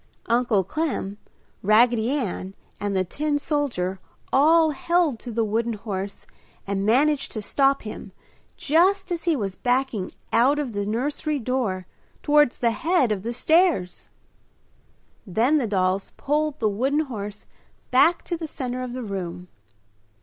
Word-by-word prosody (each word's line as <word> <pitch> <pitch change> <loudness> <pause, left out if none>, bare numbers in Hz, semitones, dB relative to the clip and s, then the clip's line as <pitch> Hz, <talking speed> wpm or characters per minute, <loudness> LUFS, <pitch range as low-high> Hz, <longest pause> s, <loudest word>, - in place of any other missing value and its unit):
Uncle 235 -4 +2
Clem, 210 - -3 0.4
Raggedy 225 +2 +4
Ann, 200 -8 -3 0.2
and 200 -1 -1
the 185 - +2
tin 290 - -1
soldier 255 - -1 0.3
all 315 +3 +5
held 330 -3 +1
to 245 - -7
the 230 0 0
wooden 225 +2 0
horse 200 -2 -5 0.4
and 195 0 -2
managed 285 +5 +2
to 220 - -3
stop 275 +4 +2
him 210 -2 -8 0.5
just 365 +5 +2
as 340 -1 -3
he 335 -2 +3
was 200 -7 -2
backing 245 -6 -1 0.2
out 260 +6 +4
of 290 -5 -2
the 205 -1 -3
nursery 290 +7 -1
door 235 -7 -2 0.4
towards 295 -3 +4
the 235 -1 +2
head 320 -1 +1
of 205 -3 -1
the 230 +4 -3
stairs. 315 - +1 1.2
Then 235 - +2
the 245 - -1
dolls 190 -1 0
pulled 300 +1 -1
the 220 - +2
wooden 260 +9 +1
horse 210 -7 -6 0.5
back 320 +7 +4
to 345 - -3
the 325 -1 -5
center 255 -3 -4
of 250 -1 -5
the 255 0 -5
room. 180 -3 -5
245 Hz, 145 wpm, -24 LUFS, 205-295 Hz, 1.2 s, all